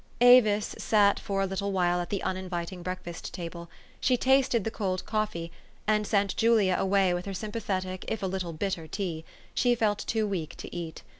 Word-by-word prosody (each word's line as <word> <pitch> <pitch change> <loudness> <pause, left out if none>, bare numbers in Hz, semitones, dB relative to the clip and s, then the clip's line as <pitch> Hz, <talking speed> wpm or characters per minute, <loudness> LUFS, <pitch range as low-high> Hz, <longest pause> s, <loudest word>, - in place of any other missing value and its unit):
Avis 235 -4 +6
sat 205 -2 +3
for 195 -1 -1
a - - +2
little 195 +1 -2
while 180 -2 +2
at 175 - -6
the 200 - -2
uninviting 185 -1 -3
break 185 +1 -4
fast 170 -1 -7
table; 170 -1 -7 0.3
she 255 -2 +2
tasted 260 -3 +3
the 225 - -2
cold 190 -5 -2
coffee, 210 -6 -2 0.3
and 210 -1 +2
sent 200 -2 +1
Julia 220 -5 +4
away 195 -1 +3
with 175 +2 -3
her 195 - -4
sympathetic 190 -3 -3
if 220 - -3
a - - +1
little 185 -2 -2
bitter 165 0 -3
tea: 165 -2 -4 0.3
she 245 -2 +3
felt 210 -3 +1
too 220 -1 0
weak 185 -7 -3
to - - -8
eat. 170 -2 -6
195 Hz, 190 wpm, -28 LUFS, 180-215 Hz, 0.3 s, Avis